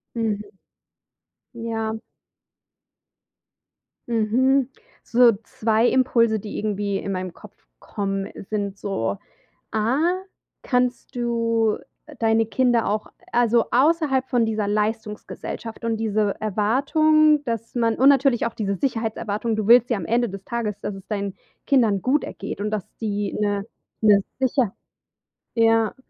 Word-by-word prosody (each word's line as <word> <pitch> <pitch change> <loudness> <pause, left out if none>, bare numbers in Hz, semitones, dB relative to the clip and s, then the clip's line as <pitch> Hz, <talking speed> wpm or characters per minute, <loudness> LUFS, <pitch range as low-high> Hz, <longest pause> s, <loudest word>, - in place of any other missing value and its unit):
Mhm. 220 -3 -1 1.1
Ja. 225 -2 -3 2.2
Mhm. 250 +4 +2 0.3
So 240 -1 +5
2 220 +2 +1
Impulse, 230 -4 +3
die 205 +1 -7
irgendwie 205 -1 -1
in 195 - -4
meinen 185 -1 -3
Kopf - - -17
kommen, 195 -1 -3 0.2
sind 200 -2 -2
so: 115 - -2 0.6
A: 225 +5 +1 0.6
kannst 250 -1 -1
du 230 -2 +1 0.4
deine 225 0 +3
Kinder 235 +1 +1
auch, 210 +1 -1 0.3
also, 235 -1 +3
außerhalb 270 -1 +2
von 240 -2 +2
dieser 215 -2 -1
Leistungsgesellschaft 215 +1 -3
und 225 -1 0
diese 215 -2 0
Erwartung, 290 - +3
dass 230 -1 -4
man 230 -2 +2
und 270 +2 +5
natürlich 270 -4 +3
auch 235 - -2
diese 200 -2 -1
Sicherheitserwartung, 225 -2 -2
du 215 - -2
willst 240 +2 +6
ja 235 - +1
am 190 - -5
Ende 235 +5 +1
des 195 0 -8
Tages, 230 -4 -3
dass 205 - -4
es 195 0 -12
deinen 200 -2 -3 0.3
Kindern 225 -8 +3
gut 275 +4 +2
ergeht 200 - -6
und 210 +1 -1
dass 210 -3 -2 0.2
die 205 -2 -2
'ne 205 -1 0 0.4
'ne 205 -2 +6 0.2
Sicher 260 -5 +1 0.8
ja. 225 -1 +3
225 Hz, 125 wpm, -23 LUFS, 210-240 Hz, 2.2 s, willst